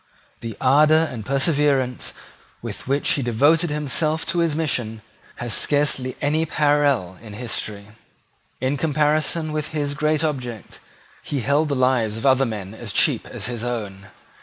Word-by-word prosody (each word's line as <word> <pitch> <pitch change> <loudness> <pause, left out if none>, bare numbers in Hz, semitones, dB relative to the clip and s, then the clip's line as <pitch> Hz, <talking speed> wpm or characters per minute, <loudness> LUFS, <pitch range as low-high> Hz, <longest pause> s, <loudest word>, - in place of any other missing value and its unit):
The 115 -2 -7
ardour 155 +4 +4
and 115 -4 -6
perseverance 140 -2 +1 0.4
with - - -7
which 140 +2 0
he 140 - +1
devoted 145 +8 +3
himself 150 +2 -1
to 175 - 0
his 165 -3 +1
mission 120 -8 -2 0.3
have 120 -1 -5
scarcely 145 -3 +2
any 150 +2 +1
parallel 145 - +1
in 110 -2 -10
history. 105 -3 -5 0.7
In 130 +3 0
comparison 155 +1 +1
with 155 0 -2
his 145 -2 -2
great 155 +1 +1
object 125 -8 -4 0.4
he 140 -3 -3
held 145 +5 +1
the 140 - 0
lives 125 -4 +1
of 115 - -5
other 135 -1 +4
men 105 -3 -6
as 110 -2 -5
cheap - - +2
as - - -6
his 120 -2 -4
own. 105 -5 -4
140 Hz, 150 wpm, -22 LUFS, 120-150 Hz, 0.7 s, ardour